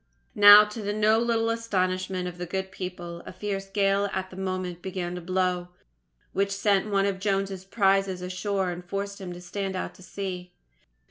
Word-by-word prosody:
Now, 205 0 +10
to 210 +1 -6
the 205 0 -2
no 215 +1 +3
little 230 -1 +1
astonishment 185 -5 -1
of 175 0 -8
the 180 - -4
good 190 +2 -3
people, 175 -2 -6
a - - -6
fierce 195 -2 -4
gale 200 0 +1
at 190 0 -3
that - - -10
moment 185 -2 -3
began 180 -2 -4
to 180 - -5
blow, 180 0 0 0.7
which 200 +1 +1
sent 200 +1 +1
one 195 -1 +2
of 195 -1 -1
Jones's 195 -1 -1
prizes 195 -2 +1
ashore 185 +1 -1
and 175 0 -7
forced 200 +2 -4
him 185 -2 -6
to 175 - -8
stand 190 +2 -4
out 185 - -4
to - - -17
sea. 185 -1 -6
190 Hz, 185 wpm, -27 LUFS, 180-200 Hz, 0.7 s, Now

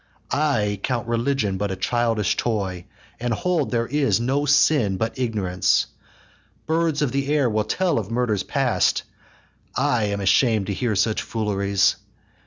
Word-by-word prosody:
I 120 -9 +1
count 120 -1 -2
religion 115 -4 0
but 105 0 -1
a 95 - -3
childish 115 0 0
toy, 95 -6 -2 0.3
And 120 0 -2
hold 170 +1 0
there 115 -1 0
is 140 -1 +1
no 135 +5 0
sin 145 -8 +3
but 115 +5 -3
ignorance. 105 -7 +1 0.8
Birds 160 -2 +1
of 135 - 0
the 140 +1 -1
air 145 -4 +3
will 110 -2 0
tell 185 -9 0
of 105 -2 -6
murders 115 -4 0
past! - - +1 0.7
I 115 -3 +1
am 100 0 -2
asham'd 105 +2 +3
to 100 - -2
hear 115 +1 -1
such 110 +2 +1
fooleries. 100 -3 0
115 Hz, 150 wpm, -23 LUFS, 100-135 Hz, 0.8 s, sin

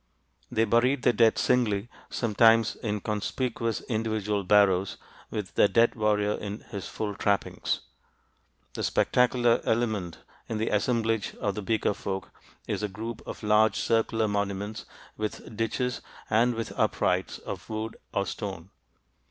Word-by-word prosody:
They 115 - +2
buried 125 +4 +2
their 125 - +4
dead 115 0 +4
singly, 115 -4 +2 0.2
sometimes 115 -1 +4
in 105 -2 -3
conspicuous 115 +2 -2
individual 110 -3 -1
barrows 95 -1 +3 0.3
with 105 -3 -4
the - - +5
dead 115 +2 +4
warrior 105 -2 +1
in 105 0 -4
his 100 -4 -7
full 105 -2 -3
trappings. 100 0 0 0.9
The - - -4
spectacular 120 -1 +3
element 110 -8 0 0.3
in 110 - -2
the 110 +1 0
assemblage 115 0 0
of 100 - -1
the 105 - -4
Beaker 110 0 +1
folk 95 -1 -5 0.4
is - - -2
a 105 - 0
group 110 +3 -6
of - - -7
large 105 +1 +4
circular 115 -1 +1
monuments 100 +1 -2 0.3
with 110 +1 -5
ditches 125 +3 -1 0.3
and 120 +2 +3
with 115 -1 -4
uprights - - +1
of - - -7
wood 110 0 -4 0.2
or 100 - 0
stone. 95 -4 -6
110 Hz, 135 wpm, -28 LUFS, 100-115 Hz, 0.9 s, the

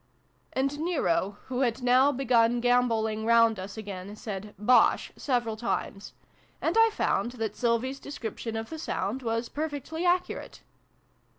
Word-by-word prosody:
'" - - -40
And 275 +2 -1
Nero, 205 - 0
who 255 -1 -3
had 250 -1 0
now 255 +3 +5
begun 245 -3 +2
gamboling 230 -3 +1
round 230 -2 +4
us 195 +3 -7
again, 200 -1 -7
said 210 -1 -7
" - - -39 0.2
Bosh! - - +4
" - - -36
several 240 -4 +1
times; 215 -3 -3 0.5
and - - 0
I 450 0 +6
found 245 - 0
that 220 -4 -3
Sylvie's 245 +3 0
description 230 -4 -6
of 225 +4 -5
the 320 - -5
sound 235 -4 -2
was 230 0 -1
perfectly 310 +3 -4
accurate. 360 0 -1
235 Hz, 155 wpm, -28 LUFS, 220-270 Hz, 0.5 s, I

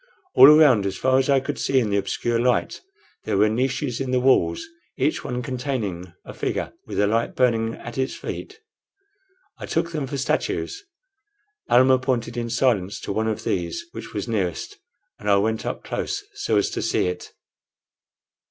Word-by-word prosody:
All 135 - +9
around, 145 -9 +6
as 95 -1 -4
far 130 0 +3
as 135 - 0
I 135 -1 +5
could 130 - -5
see 135 - +2
in 110 -5 -1
the 100 - +2
obscure 115 +4 -1
light, 125 +1 0 0.4
there - - 0
were 105 +2 +4
niches 130 +2 -1
in 135 - -3
the 125 0 +2
walls, 135 - +2 0.3
each 140 +3 0
one 125 0 -3
containing 115 - -4
a - - -9
figure - - -3
with - - -4
a 105 - +4
light 115 +3 0
burning 115 -3 +1
at 120 +2 -8
its 130 0 -1
feet. 435 +2 -7 1.0
I - - -7
took 170 - -1
them 150 -4 -3
for 140 - -4
statues. 405 - -2 0.9
Almah 130 +1 +5
pointed 125 -2 -2
in 120 -1 -3
silence 115 -6 +1
to - - -4
one 110 +2 0
of 110 -1 -2
these 90 - -2
which 115 0 -8
was 105 +1 -4
nearest, 95 -7 -3 0.4
and 105 - -3
I 100 - +6
went 110 +2 0
up - - -4
close - - -3
so 110 - 0
as 100 - +1
to - - -3
see - - +1
it. 90 0 -5
120 Hz, 180 wpm, -23 LUFS, 105-130 Hz, 1.0 s, All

